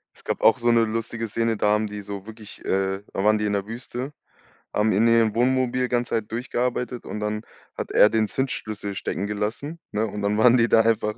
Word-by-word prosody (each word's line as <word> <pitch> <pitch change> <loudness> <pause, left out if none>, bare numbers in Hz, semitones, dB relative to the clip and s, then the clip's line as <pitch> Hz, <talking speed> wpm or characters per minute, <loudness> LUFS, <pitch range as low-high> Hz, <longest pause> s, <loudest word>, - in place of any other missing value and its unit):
Es - - -15
gab - - -3
auch 115 - +6
so 120 0 +2
'ne 115 -1 +4
lustige 115 +1 -3
Szene, 115 +1 0
da 105 - +2
haben 105 0 +2
die 105 0 -6
so 100 -1 -7
wirklich 110 -2 -11
äh, 95 0 0
da 95 - -1
waren 105 0 +4
die 105 - -1
in 105 - 0
der 100 0 -1
Wüste, 125 +4 -5 0.6
haben 105 +1 +2
in 110 +4 +3
ihrem 115 -2 +3
Wohnmobil 125 0 +2
ganze 120 0 -1
Zeit 110 -1 -3
durchgearbeitet 125 +1 -2
und 105 - -5
dann 105 0 -2 0.4
hat - - -4
er 105 - +6
den 110 -1 +1
Zündschlüssel 110 -6 -3
stecken 100 +2 -3
gelassen, 110 +10 -3
ne, 110 +2 0
und 105 0 -6
dann 105 +1 +1
waren 125 +2 +6
die 115 0 +4
da 115 - +5
einfach 110 -1 +1
110 Hz, 220 wpm, -24 LUFS, 105-120 Hz, 0.6 s, auch